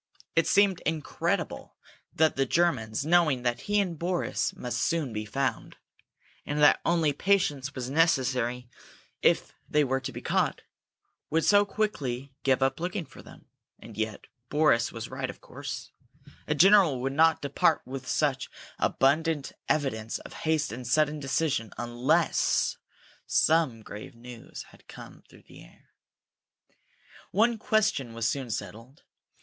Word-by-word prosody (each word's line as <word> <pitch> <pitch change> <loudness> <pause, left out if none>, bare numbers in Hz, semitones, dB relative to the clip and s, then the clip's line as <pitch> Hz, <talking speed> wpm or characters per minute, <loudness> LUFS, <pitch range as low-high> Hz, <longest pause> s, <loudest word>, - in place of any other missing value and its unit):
It - - +3
seemed 200 -3 +4
incredible 155 -1 -2 0.4
that 160 0 +2
the 135 0 +1
Germans, 140 -8 0
knowing 155 -6 +3
that 120 -1 0
he 205 0 +1
and 175 -6 -2
Boris 175 +1 -1
must 120 -1 -4
soon 145 -1 0
be 105 0 -4
found, 135 +6 -3 0.7
and 145 - -4
that 150 - +5
only 165 -4 +2
patience 145 -6 0
was 125 -2 -4
necessary 130 -5 +1 0.5
if - - +2 0.2
they 150 - +3
were 135 -1 0
to - - -6
be - - -7
caught, - - 0 0.7
would 160 0 +1
so 205 0 +5
quickly 140 - -3
give 135 0 +2
up 135 +2 0
looking 180 +1 -3
for - - -14
them. - - -15 0.3
And - - -12
yet 110 -1 -3 0.2
Boris 145 -6 +3
was 115 -1 -7
right, - - -3
of - - -9
course. - - -7 0.6
A 150 - 0
general 185 -5 +6
would 135 +1 -2
not 160 +1 +3
depart 145 +2 +2
with 130 0 -7
such 140 -4 0 0.3
abundant 145 +2 +1 0.2
evidence 115 -7 -1
of - - -12
haste 155 -3 -1
and 120 +2 -7
sudden 150 +3 +2
decision 135 -5 -1
unless 120 +2 +1 0.5
some 155 -9 +2
grave 105 +2 -9
news 120 0 -10
had - - -21
come - - -12
through - - -18
the - - -15
air. - - -21 1.4
One 225 +3 +2
question 210 - 0
was 115 0 0
soon 135 -3 -2
settled. 115 +6 -7
140 Hz, 145 wpm, -28 LUFS, 125-165 Hz, 1.4 s, general